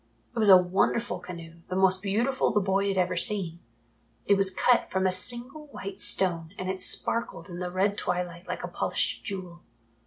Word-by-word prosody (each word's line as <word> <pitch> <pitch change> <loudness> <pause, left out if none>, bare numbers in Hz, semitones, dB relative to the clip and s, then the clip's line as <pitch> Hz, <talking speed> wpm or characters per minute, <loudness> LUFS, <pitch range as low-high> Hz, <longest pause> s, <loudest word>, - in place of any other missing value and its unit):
It - - -2
was 215 -2 +3
a 190 - +10
wonderful 190 +6 0
canoe, 170 -2 -11
the 185 - -3
most 190 0 +3
beautiful 230 +7 0
the 210 - +1
boy 195 0 0
had 195 -1 -1
ever 180 0 0
seen. 175 -3 0 0.7
It - - +3
was 195 -1 +3
cut 240 +5 +2
from 190 0 -1
a 185 - +2
single 250 +10 +2
white 200 -8 -8
stone 180 -4 +1
and 185 0 -3
it 190 -1 -7
sparkled 230 -1 +1
in 175 - -7
the 180 -1 -4
red 195 +3 -1
twilight 180 0 -4
like - - -5
a - - -3
polished - - -2
jewel. 180 -4 -7
190 Hz, 190 wpm, -27 LUFS, 180-205 Hz, 0.7 s, a